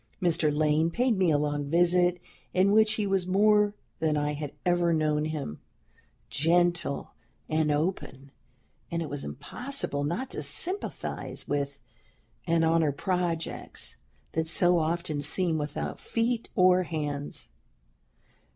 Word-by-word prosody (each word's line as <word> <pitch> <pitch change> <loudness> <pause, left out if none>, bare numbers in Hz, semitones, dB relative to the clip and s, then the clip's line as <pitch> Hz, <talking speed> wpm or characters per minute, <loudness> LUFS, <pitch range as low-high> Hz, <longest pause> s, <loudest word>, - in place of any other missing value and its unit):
Mr. 165 -4 +2
Lane 155 +2 +2
paid 240 +5 +1
me 185 -3 +2
a 150 - +4
long 145 -1 -1
visit, 175 +2 +3 0.4
in 190 +2 +4
which 215 0 +5
he 215 -2 -1
was 195 -2 0
more 210 +2 +4 0.2
than 155 -2 +1
I 145 0 0
had 145 -1 -5
ever 175 -1 +3
known 155 -1 +1
him 150 - -4 0.7
gentle 175 -1 +1 0.3
and 155 -1 +1
open; 145 -3 -2 0.6
and 170 0 -2
it 155 - -6
was 145 -1 -3
impossible 145 - -3
not 200 - -2
to - - -3
sympathize 380 +3 -2
with 140 -1 -2 0.7
and 165 0 +3
honor 160 -2 +3
projects 170 +1 -3 0.4
that 160 0 -1
so 175 +2 +3
often 160 -2 -1
seem 160 +2 +2
without 150 0 -4
feet 230 0 -1
or 185 -1 +5
hands. 150 -4 -4
165 Hz, 130 wpm, -28 LUFS, 150-185 Hz, 0.7 s, which